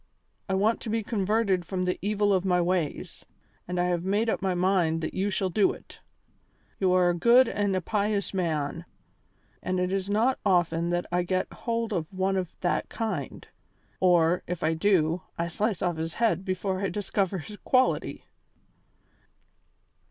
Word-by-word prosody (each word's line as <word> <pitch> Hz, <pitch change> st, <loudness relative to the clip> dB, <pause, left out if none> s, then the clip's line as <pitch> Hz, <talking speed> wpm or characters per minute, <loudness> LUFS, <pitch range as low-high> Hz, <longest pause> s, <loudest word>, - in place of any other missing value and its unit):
I 190 Hz, -, +1 dB
want 210 Hz, +4 st, +1 dB
to 230 Hz, -, -6 dB
be 225 Hz, 0 st, 0 dB
converted 205 Hz, -3 st, +1 dB
from 185 Hz, +1 st, -3 dB
the 180 Hz, -, -1 dB
evil 205 Hz, 0 st, +1 dB
of 185 Hz, -1 st, +2 dB
my 180 Hz, -2 st, +2 dB
ways, 175 Hz, -3 st, -2 dB, 0.4 s
and 180 Hz, 0 st, -2 dB
I -, -, +3 dB
have 175 Hz, -1 st, -1 dB
made 210 Hz, +4 st, +1 dB
up -, -, -2 dB
my 190 Hz, -2 st, 0 dB
mind 175 Hz, -3 st, +1 dB
that 160 Hz, -, -4 dB
you 195 Hz, +2 st, 0 dB
shall 190 Hz, -2 st, -1 dB
do 205 Hz, +2 st, +3 dB
it. -, -, -14 dB, 0.8 s
You 190 Hz, -2 st, +2 dB
are 180 Hz, -1 st, +4 dB
a -, -, -2 dB
good 240 Hz, +8 st, +5 dB
and 205 Hz, -3 st, 0 dB
a 185 Hz, -, 0 dB
pious 205 Hz, +1 st, -1 dB
man, 165 Hz, -3 st, -2 dB, 0.8 s
and 185 Hz, 0 st, -1 dB
it 180 Hz, 0 st, 0 dB
is 195 Hz, 0 st, -2 dB
not 230 Hz, +6 st, +2 dB
often 175 Hz, -3 st, +2 dB
that 175 Hz, 0 st, 0 dB
I 180 Hz, +1 st, +2 dB
get 185 Hz, +1 st, -2 dB
hold 230 Hz, 0 st, -2 dB
of 170 Hz, -2 st, -3 dB
one 190 Hz, 0 st, 0 dB
of 185 Hz, -3 st, -2 dB
that 175 Hz, -, 0 dB
kind; 195 Hz, -, -4 dB, 0.5 s
or, 175 Hz, -1 st, +4 dB
if 180 Hz, -1 st, -4 dB
I 160 Hz, +1 st, +2 dB
do, 165 Hz, -1 st, +2 dB, 0.2 s
I 170 Hz, -, -1 dB
slice 205 Hz, +3 st, -1 dB
off 175 Hz, -3 st, 0 dB
his 160 Hz, 0 st, -4 dB
head 220 Hz, -6 st, +1 dB
before 185 Hz, 0 st, -2 dB
I 195 Hz, -, 0 dB
discover 200 Hz, -2 st, -1 dB
his 205 Hz, +5 st, -8 dB
quality." 255 Hz, +4 st, +1 dB
185 Hz, 175 wpm, -27 LUFS, 175-205 Hz, 0.8 s, good